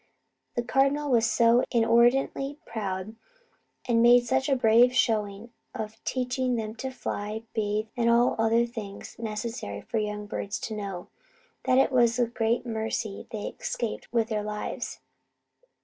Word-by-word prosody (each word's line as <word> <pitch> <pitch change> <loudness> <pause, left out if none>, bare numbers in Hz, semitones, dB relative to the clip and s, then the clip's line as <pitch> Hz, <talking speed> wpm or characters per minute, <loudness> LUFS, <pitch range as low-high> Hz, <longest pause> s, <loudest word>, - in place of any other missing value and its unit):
The 240 - 0
Cardinal 275 +3 +1
was 230 -2 +4
so 235 +2 +4
inordinately 240 +4 +2
proud, 205 -2 -4 0.7
and 230 -2 +3
made 240 +1 +6
such 265 +3 +1
a 270 - +4
brave 245 +1 +5
showing 215 -2 0 0.2
of 220 +1 -6
teaching 250 0 -1
them 220 -2 -3
to 265 - -4
fly, 215 -3 -4
bathe, 215 -1 0
and 235 -1 +2
all 235 +1 +4
the - - -1
other 230 +1 +3
things 215 -4 -8
necessary 215 - -4
for 225 - -2
young 210 0 -3
birds 205 +1 -4
to 220 - -4
know, 195 -4 -6 0.6
that 255 - +3
it 270 - +4
was 240 -2 +3
a 245 - +3
great 235 +1 -1
mercy 220 -2 -3
they 215 -2 -5
escaped 230 -2 -4
with 230 -2 +1
their 215 -2 -1
lives. 210 0 -5
230 Hz, 150 wpm, -27 LUFS, 215-245 Hz, 0.7 s, made